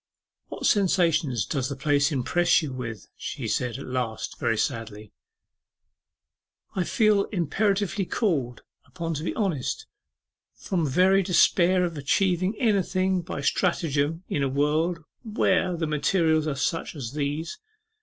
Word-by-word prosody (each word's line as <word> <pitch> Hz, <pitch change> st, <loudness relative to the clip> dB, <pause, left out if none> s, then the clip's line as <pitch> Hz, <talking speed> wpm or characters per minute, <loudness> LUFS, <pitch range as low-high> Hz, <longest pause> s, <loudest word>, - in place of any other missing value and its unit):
'What -, -, -6 dB
sensations 170 Hz, -, +2 dB
does 135 Hz, -4 st, -2 dB
the 140 Hz, -, -4 dB
place 145 Hz, +2 st, +2 dB
impress 175 Hz, +6 st, +2 dB
you 140 Hz, -4 st, -4 dB
with?' 120 Hz, -6 st, -6 dB
she -, -, -5 dB
said 125 Hz, -1 st, -1 dB
at 140 Hz, -, -8 dB
last, 125 Hz, -4 st, -4 dB
very 115 Hz, -2 st, 0 dB
sadly. 105 Hz, -2 st, -3 dB, 1.6 s
'I 185 Hz, -2 st, 0 dB
feel 215 Hz, 0 st, +3 dB
imperatively 195 Hz, +3 st, 0 dB
called 145 Hz, -, -1 dB, 0.2 s
upon 165 Hz, -2 st, -4 dB
to 150 Hz, 0 st, -4 dB
be -, -, -3 dB
honest, 175 Hz, -, -2 dB, 0.7 s
from 170 Hz, -5 st, -2 dB
very 185 Hz, +7 st, +4 dB
despair 180 Hz, 0 st, +3 dB
of 165 Hz, -4 st, -4 dB
achieving 185 Hz, +6 st, +1 dB
anything 190 Hz, -4 st, +1 dB
by 160 Hz, -, -5 dB
stratagem 160 Hz, 0 st, 0 dB
in 145 Hz, -, -1 dB
a 135 Hz, -, +1 dB
world 155 Hz, +5 st, 0 dB, 0.2 s
where 190 Hz, -5 st, +1 dB
the 165 Hz, -, -1 dB
materials 155 Hz, +1 st, +1 dB
are 145 Hz, -, -1 dB
such 165 Hz, +4 st, -2 dB
as 130 Hz, -4 st, -6 dB
these. 150 Hz, +3 st, -3 dB
160 Hz, 135 wpm, -26 LUFS, 140-185 Hz, 1.6 s, very